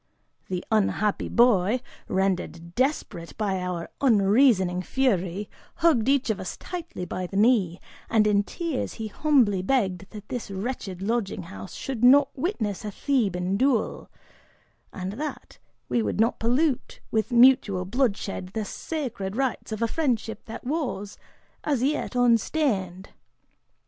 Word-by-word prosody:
The 180 -1 -4
unhappy 210 -1 +1
boy, 235 -1 +4 0.3
rendered 180 -3 -1
desperate 250 - -2
by 195 -4 -1
our 180 -2 -4
unreasoning 205 -5 +4
fury, 195 -4 0 0.3
hugged 270 -8 +3
each 275 -4 +2
of 210 - -3
us 185 - -5
tightly 345 - -6
by 180 0 -4
the 195 - -5
knee, 205 -6 +3 0.3
and 220 -2 +4
in 205 -1 +4
tears 320 - -3
he 220 -2 -5
humbly 235 -8 +3
begged 195 -4 0
that 210 -1 -10
this 245 -4 -4
wretched 195 -2 -4
lodging 215 -3 -1
house 95 -11 -9
should 255 -4 -4
not 275 +3 +6
witness 245 - -2
a 210 - -3
Theban 195 -6 0
duel, 260 -1 0 0.8
and 185 0 -5
that 300 -3 -6 0.3
we 120 -1 +1
would 105 - -2
not 225 +2 +2
pollute 255 +4 0
with 220 +1 0
mutual 240 -7 +5
bloodshed 200 -4 -1
the 220 -1 -1
sacred 230 -7 -4
rites 265 -3 -2
of 215 +1 -2
a - - +3
friendship 235 -6 -1
that 225 - -8
was, 255 -8 -3 0.4
as 280 -5 0
yet, 285 -1 -1
unstained. 230 - +1
220 Hz, 135 wpm, -26 LUFS, 190-255 Hz, 0.8 s, not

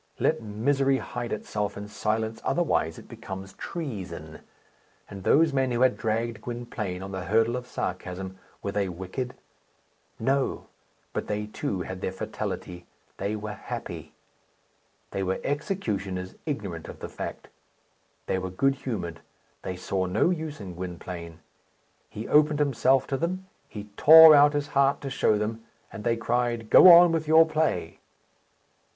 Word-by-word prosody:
Let - - +1
misery 135 +6 +1
hide 120 -2 -5
itself 105 -1 -3
in 105 0 -6
silence, 110 +1 -2
otherwise 150 - 0
it - - -12
becomes 95 0 -8
treason. 90 - -6 0.7
And 100 -1 -9
those 155 +5 +4
men 130 -1 +1
who 120 0 -1
had 130 -1 +4
dragged 115 0 -2
Gwynplaine 110 -6 -5
on 95 - -7
the 95 -1 -5
hurdle 115 +5 +2
of 125 0 -5
sarcasm, 95 -2 -5 0.2
were 100 - -2
they 100 -1 -1
wicked? 95 +8 -5 0.8
No; 135 +3 0 0.5
but - - -3
they, 105 0 -2
too, 100 -3 -3
had 95 +1 -7
their - - -2
fatality 95 -3 -5 0.3
they 105 +2 -2
were 105 0 -5
happy. - - -7 1.0
They 100 - -2
were 95 0 -1
executioners, 100 - -3
ignorant 100 - -4
of - - -9
the - - -6
fact. - - -7 0.8
They 95 - -1
were 95 0 -4
good 135 +10 +2
humoured; 100 -11 -5 0.4
they 95 - -4
saw 95 +1 -2
no 105 - +2
use 160 -3 -4
in 95 -4 -7
Gwynplaine. 85 -1 -7 0.7
He 110 - -7
opened 150 0 +4
himself 135 -2 +2
to 135 - -2
them. 185 +5 -2 0.2
He 105 -1 -9
tore 160 +1 +10
out 145 0 +6
his 145 0 -2
heart 140 0 +3
to 135 -2 -5
show 110 -4 +2
them, 110 +2 -3 0.3
and 105 - -7
they 115 -1 +1
cried, 120 -1 -1
"Go 185 - +10
on 170 0 +9
with 160 -2 -1
your 160 +1 +7
play!" 155 - -1
110 Hz, 150 wpm, -26 LUFS, 95-135 Hz, 1.0 s, tore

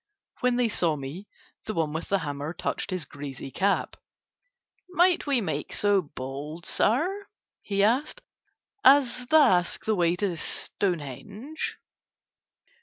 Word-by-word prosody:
When 250 -1 +2
they 245 -1 +2
saw 170 -7 +1
me 145 +8 -7 0.4
the 215 - -3
one 155 -2 0
with 160 - -4
the 195 - +3
hammer 145 -1 -4
touched - - -3
his 185 -5 -2
greasy 140 -1 -8
cap. 200 +7 0 0.9
"Might 360 -2 +3
we 275 -4 +2
make 195 - -3
so 205 -1 +3
bold, 145 +2 -7
sir," 365 - +1 0.3
he 200 -1 -1
said, 245 +9 +2 0.6
"as 255 -2 +5
the 315 - +5
ask 180 - +3
the 220 - +2
way 175 -3 +2
to 185 -1 -1
Stonehenge?" 200 - -3
195 Hz, 130 wpm, -27 LUFS, 155-245 Hz, 0.9 s, as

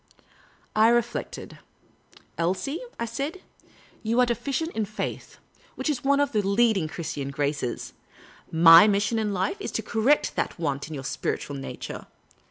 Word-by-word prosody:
I 215 +1 +6
reflected, 240 0 -1 0.4
" - - -27
Elsie," 185 - -1 0.2
I 235 - -1
said, 280 +10 -5 0.3
" - - -28
you 230 +2 0
are 250 - +6
deficient 265 +7 -2
in 220 - -1
faith 210 +1 -6 0.2
— - - -30
which 310 - -1
is 285 - -4
one 280 +1 +3
of 285 - +1
the 215 - +1
leading 200 -3 +2
Christian 150 -4 -5
graces. 140 -3 -3 0.6
My 165 +3 +9
mission 210 +2 +1
in 215 -1 -1
life 195 - -1
is - - -4
to - - -2
correct 240 +6 +2
that - - -2
want 145 -4 -2
in 160 - -7
your 135 - -6
spiritual 140 +1 -3
nature. 135 - -7
215 Hz, 165 wpm, -26 LUFS, 165-240 Hz, 0.6 s, My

